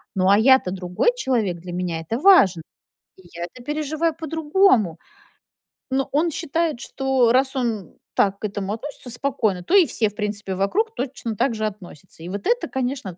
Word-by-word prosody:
Ну, 185 0 +2
а 200 - +6
я-то 260 -5 +5
другой 180 - 0
человек, 225 - -1
для 175 +1 -8
меня 175 -2 -3
это 220 +9 -3
важн 270 - +6 0.6
И - - -16
я 170 - -5
это 240 +8 -13
переживаю 310 +2 -1
по-другому. 310 - +2 0.9
Но 270 0 0
он 320 +3 +1
считает, 330 -4 -1
что 265 -4 +1
раз 265 +2 +2
он 225 - -2 0.2
так 200 0 +2
к - - -4
этому 200 0 -4
относится 260 +2 -8
спокойно, 225 -7 -1
то 355 - -3
и 380 -4 +7
все, 220 -3 0
в 205 - -20
принципе, 205 -3 -3
вокруг 415 - 0
точно 250 -4 -4
так 235 +2 0
же 215 - -2
относятся. 185 -5 -9
И 175 - -7
вот 200 +2 -5
это, 485 +1 +1
конечно, 255 -8 -3
230 Hz, 180 wpm, -22 LUFS, 195-285 Hz, 0.9 s, и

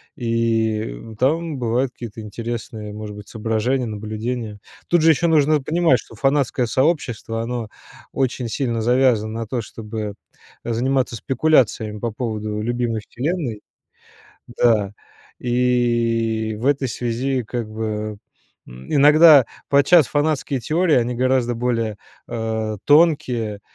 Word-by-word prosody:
и 115 -2 0 0.2
там 155 +3 0
бывают 125 +2 0
какие-то 115 -3 -9
интересные, 110 -1 -6
может 105 -1 -7
быть, 105 0 -11
соображения, 115 +3 -1
наблюдения. 110 +1 -5 0.3
Тут 175 -1 +3
же 165 - +5
еще 160 +2 +3
нужно 155 -2 +3
понимать, 160 -2 +2
что - - -13
фанатское 135 -3 +1
сообщество, 125 -4 0
оно 115 -1 -3 0.5
очень 130 -2 -1
сильно 115 0 -2
завязано 120 -2 +2
на - - -3
то, 120 +3 -3
чтобы 105 -1 -6 0.5
заниматься 125 +1 0
спекуляциями 120 -5 +1
по 115 0 -2
поводу 110 -2 -3
любимой 120 -1 -1
вселенной. 130 - -3 0.9
Да. 110 -4 +2 0.5
И 120 -3 +1
в 120 - -4
этой 140 -1 +2
связи 125 +3 -2
как 115 0 -4
бы, 110 -1 -4 0.5
м, 65 +1 -10
иногда 150 -1 +7 0.2
подчас 140 +2 +5
фанатские 145 -2 0
теории, 160 +6 +2
они 125 0 +1
гораздо 125 -1 +1
более, 115 -3 -1 0.3
а, 110 -1 -3
тонкие, 130 -9 +3
120 Hz, 120 wpm, -21 LUFS, 110-135 Hz, 0.9 s, иногда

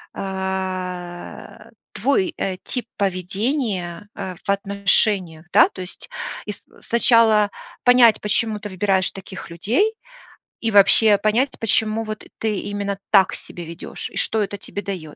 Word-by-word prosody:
а, 190 +1 -5 0.2
твой, 220 -4 +1
э, 185 -1 -2
тип 245 -3 -2
поведения, 195 - -2
а, 190 -2 -5
в - - -10
отношениях. 200 -4 +1
Да, 205 - +7
то 185 - -9
есть, 185 - -9 0.4
и - - -2
с - - -19 0.2
сначала 225 -3 +4 0.3
понять, 245 -3 +6
почему 210 +1 0
ты 210 - -7
выбираешь 190 0 +1
таких 190 -2 -9
людей, 240 - +1 0.7
и 225 - 0
вообще 205 +1 +6
понять, 215 +7 +1
почему 220 0 +1
вот, 215 -1 -6
ты 215 -3 -1
именно 200 -1 -3
так 195 -2 +5
себя 175 - -9
ведёшь, 170 +2 -7
и - - -8
что 220 -1 +1
это 205 0 -5
тебе 200 0 -6
даёт. 180 -7 -6
200 Hz, 140 wpm, -21 LUFS, 185-220 Hz, 0.7 s, Да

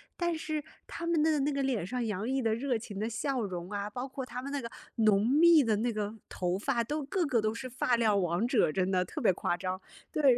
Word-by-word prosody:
但 345 -1 0
是 310 -1 -3 0.2
他 335 - -6
们 335 -2 +2
的 310 -2 +3
那 290 +2 +1
个 280 -1 -1
脸 250 -9 0
上 250 +5 -2
洋 210 0 -2
溢 265 +1 0
的 225 -2 +1
热 250 0 0
情 215 -2 -8
的 215 +3 -1
笑 255 +3 -1
容 180 -4 -4
啊， 205 0 -3
包 250 +5 -5
括 265 0 -5
他 250 0 -6
们 275 - -6
那 285 - -1
个 230 - -6 0.3
浓 215 -1 +4
密 315 0 +6
的 220 -2 +3
那 235 +3 0
个 210 0 -3
头 180 0 -1
发， 235 +4 0
都 295 +6 -2
个 350 +6 0
个 250 -6 +2
都 215 0 0
是 255 +2 -6
发量 235 -3 +2
王 180 +3 +1
者， 245 - +3
真 185 +2 0
的 185 -1 +2
特 180 - -6
别 220 -9 +4
夸 175 - -1
张， 185 +1 -3 0.3
对。 305 - -1
235 Hz, 270 characters per minute, -30 LUFS, 205-275 Hz, 0.3 s, 密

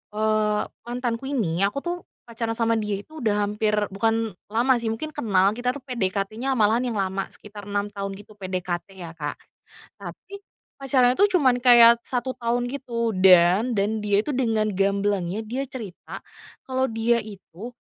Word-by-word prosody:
Eee, 215 -1 +1 0.3
mantanku 245 +1 -3
ini, 190 -11 -1
aku 205 +8 -1
tuh 350 +1 -2 0.3
pacaran 230 -1 -3
sama 230 -1 +1
dia 210 -2 -2
itu 315 0 -12
udah 210 -4 +1
hampir 210 +1 -1 0.2
bukan 225 +2 0 0.2
lama 240 +4 +3
sih, 230 - -4
mungkin 305 +8 -5
kenal. 200 -8 +2
Kita 250 +1 -1
tuh 285 - -9
PDKT-nya 220 +2 -2
malahan 220 +3 +3
yang - - -4
lama, 190 0 -2
sekitar 205 -1 -11
6 205 0 -1
tahun 195 -1 -5
gitu. 210 0 -15
PDKT 185 0 -4
ya, 170 -2 -7
Kak. 150 -2 -4 0.7
Tapi, 400 0 -10 0.4
pacarannya 255 -2 +3
itu 405 - +6
cuman 255 -5 +3
kayak 235 -1 +7
1 255 +1 -2
tahun 240 +1 -1
gitu. 235 -4 -2
Dan, 185 +5 +5
dan 210 +3 0
dia 205 0 +2
itu 300 - -4
dengan 225 -4 +1
gamblangnya 200 0 0
dia 255 +5 -3
cerita, 220 -9 -8 0.5
kalau 260 0 0
dia 225 +1 +1
itu 210 +2 -10
220 Hz, 160 wpm, -24 LUFS, 200-245 Hz, 0.7 s, kayak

